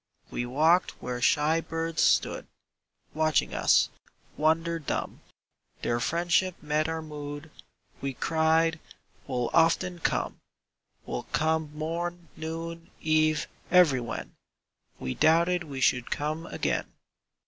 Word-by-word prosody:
We 120 Hz, -, -2 dB
walked 160 Hz, +8 st, +3 dB
where 125 Hz, 0 st, -4 dB
shy 150 Hz, +6 st, +3 dB
birds 165 Hz, 0 st, -2 dB
stood -, -, +2 dB, 0.7 s
Watching 155 Hz, -3 st, +1 dB
us, -, -, +4 dB, 0.5 s
wonder 165 Hz, +2 st, +1 dB
dumb; 150 Hz, -, -4 dB, 0.6 s
Their 120 Hz, 0 st, +1 dB
friendship 175 Hz, +6 st, +1 dB
met 150 Hz, +1 st, 0 dB
our 160 Hz, 0 st, -3 dB
mood; 145 Hz, 0 st, -7 dB, 0.5 s
We 135 Hz, -1 st, -3 dB
cried: 160 Hz, +1 st, +2 dB, 0.5 s
"We'll 125 Hz, -3 st, -1 dB
often 170 Hz, +2 st, +3 dB
come: -, -, -1 dB, 0.7 s
We'll -, -, -5 dB
come 160 Hz, 0 st, +1 dB
morn, 170 Hz, +2 st, -4 dB
noon, 165 Hz, +1 st, -6 dB
eve, 155 Hz, -1 st, +2 dB, 0.2 s
everywhen!" 140 Hz, -10 st, +3 dB, 0.7 s
—We 65 Hz, -, -3 dB
doubted 170 Hz, +2 st, +3 dB
we 140 Hz, -3 st, -6 dB
should 125 Hz, -1 st, +2 dB
come 155 Hz, +3 st, -2 dB
again. -, -, -1 dB
160 Hz, 110 wpm, -28 LUFS, 150-165 Hz, 0.7 s, us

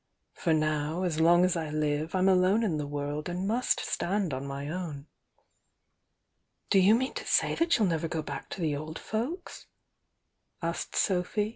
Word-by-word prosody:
For 170 Hz, -, -1 dB
now, 155 Hz, +2 st, 0 dB
as 165 Hz, -4 st, -1 dB
long 175 Hz, +2 st, +6 dB
as 185 Hz, -, +1 dB
I 160 Hz, -2 st, -2 dB
live 150 Hz, +2 st, -1 dB
I'm 185 Hz, 0 st, +3 dB
alone 190 Hz, +4 st, +4 dB
in 175 Hz, -8 st, 0 dB
the 145 Hz, -1 st, -3 dB
world 145 Hz, +2 st, -3 dB
and 180 Hz, +2 st, -2 dB
must 240 Hz, +4 st, +1 dB
stand 190 Hz, -4 st, -1 dB
on 135 Hz, +2 st, -4 dB
my 140 Hz, +1 st, -5 dB
own." 155 Hz, -4 st, -5 dB, 1.7 s
"Do 195 Hz, -, +6 dB
you 195 Hz, +4 st, +6 dB
mean 260 Hz, +3 st, -1 dB
to -, -, -6 dB
say -, -, +3 dB
that 335 Hz, +1 st, +2 dB
you'll 220 Hz, -, +3 dB
never 165 Hz, -1 st, 0 dB
go 160 Hz, -1 st, -3 dB
back 140 Hz, -2 st, -6 dB
to 190 Hz, -, -6 dB
the 155 Hz, -3 st, 0 dB
old 155 Hz, +2 st, -6 dB
folks?" 265 Hz, -, -5 dB, 0.5 s
>. -, -, -34 dB
od -, -, 0 dB, 0.2 s
Sophy. 200 Hz, +2 st, +1 dB
170 Hz, 180 wpm, -29 LUFS, 150-195 Hz, 1.7 s, long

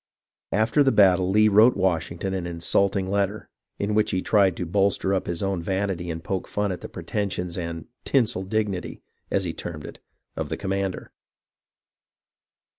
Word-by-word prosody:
After 110 Hz, +7 st, +2 dB
the 135 Hz, -, +3 dB
battle 95 Hz, -4 st, +4 dB
Lee 105 Hz, +2 st, +5 dB
wrote 110 Hz, +4 st, +5 dB
Washington 90 Hz, 0 st, -1 dB
an 90 Hz, -2 st, -3 dB
insulting 95 Hz, +3 st, +1 dB
letter, 100 Hz, +2 st, -1 dB, 0.3 s
in 100 Hz, +1 st, -1 dB
which 110 Hz, 0 st, +2 dB
he 95 Hz, -3 st, -1 dB
tried 100 Hz, -4 st, +3 dB
to 90 Hz, -, -3 dB
bolster 95 Hz, +2 st, +1 dB
up 95 Hz, -, -1 dB
his 85 Hz, +2 st, -3 dB
own 95 Hz, -3 st, -1 dB
vanity 95 Hz, -1 st, -2 dB
and 80 Hz, 0 st, -5 dB
poke 95 Hz, -2 st, -3 dB
fun 105 Hz, -1 st, -1 dB
at 90 Hz, -, -5 dB
the -, -, -7 dB
pretensions 90 Hz, -4 st, -3 dB
and 85 Hz, -2 st, -5 dB, 0.2 s
"tinsel 115 Hz, -8 st, +1 dB
dignity," 100 Hz, -1 st, -3 dB, 0.3 s
as 100 Hz, -, 0 dB
he 85 Hz, -3 st, -3 dB
termed 75 Hz, -4 st, -6 dB
it, -, -, -10 dB, 0.4 s
of -, -, -4 dB
the -, -, -3 dB
commander. 95 Hz, -1 st, -3 dB
95 Hz, 165 wpm, -25 LUFS, 90-100 Hz, 0.4 s, Lee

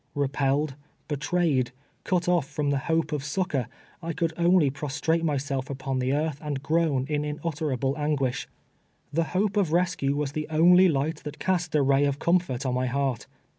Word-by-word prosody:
Repelled, 140 Hz, +1 st, 0 dB, 0.3 s
betrayed, 150 Hz, -3 st, +1 dB, 0.4 s
cut 180 Hz, -1 st, 0 dB
off 175 Hz, -6 st, +2 dB
from 145 Hz, -1 st, -1 dB
the 140 Hz, -, +1 dB
hojje 160 Hz, -1 st, +1 dB
of 150 Hz, -2 st, -2 dB
succor, 150 Hz, -4 st, -1 dB, 0.3 s
I 165 Hz, 0 st, -3 dB
could 165 Hz, 0 st, -1 dB
only 170 Hz, -4 st, +4 dB
prostrate 150 Hz, +4 st, -1 dB
myself 140 Hz, -3 st, -1 dB
upon 135 Hz, -1 st, -3 dB
the 130 Hz, +1 st, 0 dB
earth 150 Hz, 0 st, -1 dB
and 145 Hz, -3 st, -4 dB
groan 155 Hz, -4 st, +1 dB
in 150 Hz, -1 st, -1 dB
unutterable 150 Hz, -3 st, -2 dB
an 150 Hz, 0 st, 0 dB
guish. 130 Hz, -3 st, -2 dB, 0.7 s
The 165 Hz, +2 st, +1 dB
hope 205 Hz, +1 st, +1 dB
of 190 Hz, -6 st, +2 dB
rescue 170 Hz, -5 st, +1 dB
was 145 Hz, -1 st, -1 dB
the 155 Hz, +1 st, -3 dB
only 175 Hz, +4 st, +6 dB
light 150 Hz, +1 st, 0 dB
that 150 Hz, -, -8 dB
cast 175 Hz, -4 st, -1 dB
a 145 Hz, -, +4 dB
ray 135 Hz, +1 st, +3 dB
of 140 Hz, -1 st, 0 dB
comfort 165 Hz, -6 st, +1 dB
on 130 Hz, -, 0 dB
my 125 Hz, 0 st, 0 dB
heart. 135 Hz, -1 st, -1 dB
150 Hz, 175 wpm, -26 LUFS, 135-165 Hz, 0.7 s, only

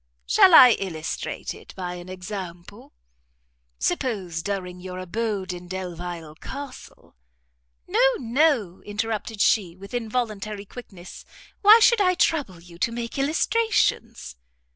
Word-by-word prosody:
"Shall 345 Hz, -, +6 dB
I 250 Hz, -4 st, +10 dB
illustrate 165 Hz, -5 st, -4 dB
it -, -, -14 dB
by 180 Hz, -1 st, -4 dB
an 175 Hz, 0 st, -9 dB
example? 185 Hz, -2 st, -8 dB, 0.9 s
Suppose, 180 Hz, -, -2 dB
during 180 Hz, -2 st, -4 dB
your 180 Hz, 0 st, -7 dB
abode 195 Hz, 0 st, -3 dB
in 180 Hz, 0 st, -9 dB
Delvile 175 Hz, -3 st, -6 dB
Castle?" 275 Hz, -, -10 dB, 0.7 s
"No, -, -, +1 dB, 0.2 s
no," 245 Hz, -, +1 dB
interrupted 215 Hz, +1 st, -3 dB
she, 185 Hz, -6 st, +2 dB
with 195 Hz, +3 st, -13 dB
involuntary 215 Hz, -3 st, -3 dB
quickness, 190 Hz, -6 st, -11 dB, 0.4 s
"why 430 Hz, +2 st, +9 dB
should 460 Hz, -1 st, +5 dB
I 365 Hz, -2 st, +3 dB
trouble 285 Hz, -, 0 dB
you 170 Hz, 0 st, -15 dB
to 230 Hz, -, 0 dB
make 235 Hz, +2 st, -5 dB
illustrations?" 280 Hz, -, 0 dB
200 Hz, 120 wpm, -24 LUFS, 180-240 Hz, 0.9 s, I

